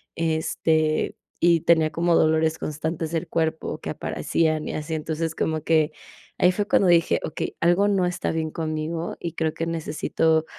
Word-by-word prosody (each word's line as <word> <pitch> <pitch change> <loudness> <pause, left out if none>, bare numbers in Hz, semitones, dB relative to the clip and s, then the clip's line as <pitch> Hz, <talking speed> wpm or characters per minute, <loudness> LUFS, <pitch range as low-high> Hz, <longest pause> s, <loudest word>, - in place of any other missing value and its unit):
este, 160 -1 0 0.3
y 170 -1 +5
tenía 160 -1 +3
como 170 +2 +2
dolores 160 0 +3
constantes 160 +2 -3
del 165 -2 -2
cuerpo 160 -1 -1
que - - -6
aparecían 155 -2 -1
y - - -4
así, 155 +1 -3
entonces, 160 +1 -3
como 155 -1 -1
que 155 -1 +3 0.5
ahí 180 - +5
fue 205 +1 -1
cuando 190 - +3
dije: 170 -1 +4
"Okey, 155 - -4
algo 175 +4 +4
no 195 -3 +2
está 180 - -2
bien 160 -1 -2
conmigo 160 +1 -3
y 170 -2 -5
creo 160 -1 -1
que 165 +1 -3
necesito 160 0 0
160 Hz, 165 wpm, -24 LUFS, 155-170 Hz, 0.5 s, y